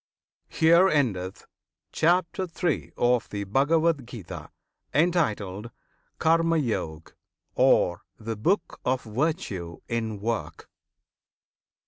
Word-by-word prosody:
HERE 170 +4 +5
ENDETH 100 - -1 0.5
CHAPTER 180 +2 +1 0.2
III. 170 -5 0
OF 120 -1 +2
THE 100 -1 -4
BHAGAVAD 145 +4 +2
GITA, 90 -10 -8 0.5
Entitled 115 - +1 0.5
"Karma 165 +1 +3
Yog," 80 - -3 0.4
Or 90 +3 +3 0.2
"The 115 0 -4
Book 170 - 0
of 130 0 0
Virtue 110 - -2
in 110 -3 -2
Work." 115 +2 -4
120 Hz, 90 wpm, -26 LUFS, 105-165 Hz, 0.5 s, HERE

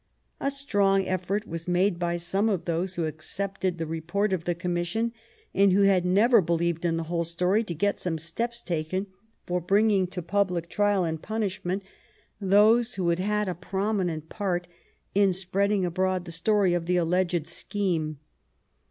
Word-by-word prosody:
A 275 - 0
strong 200 -9 +1
effort 185 +4 -1
was 165 +1 -6
made 180 0 +2
by 175 0 0
some 195 +5 0
of 195 -5 -1
those 175 +2 -1
who 170 - -1
accepted 185 +4 -3
the 165 - -2
report 170 +6 -1
of 170 -3 -2
the 175 - 0
commission, 175 +6 -1 0.4
and 200 0 +4
who 200 - +4
had 190 -2 +4
never 215 +5 +5
believed 170 0 0
in 165 -1 +1
the 165 - -2
whole 170 +1 -1
story, 180 +6 +1
to 175 -6 -5
get 205 +6 0
some 170 -3 -2
steps 235 +9 -3
taken 175 +3 -2 0.4
for 180 0 -1
bringing 200 +1 +3
to 180 -1 -6
public 180 -2 0
trial 205 -2 +2
and 160 -2 -2
punishment 200 -3 -2 0.6
those 215 +4 +4
who 180 -3 0
had 170 +1 +1
had 210 +2 0
a 185 - -1
prominent 185 -3 -2
part 180 -3 -2 0.5
in 195 -1 +4
spreading 195 +2 0
abroad 185 +1 0
the 170 - -7
story 190 +2 +2
of 170 -1 -1
the 180 0 +2
alleged 175 -1 +1
scheme. 165 -8 -2
185 Hz, 170 wpm, -27 LUFS, 170-200 Hz, 0.6 s, never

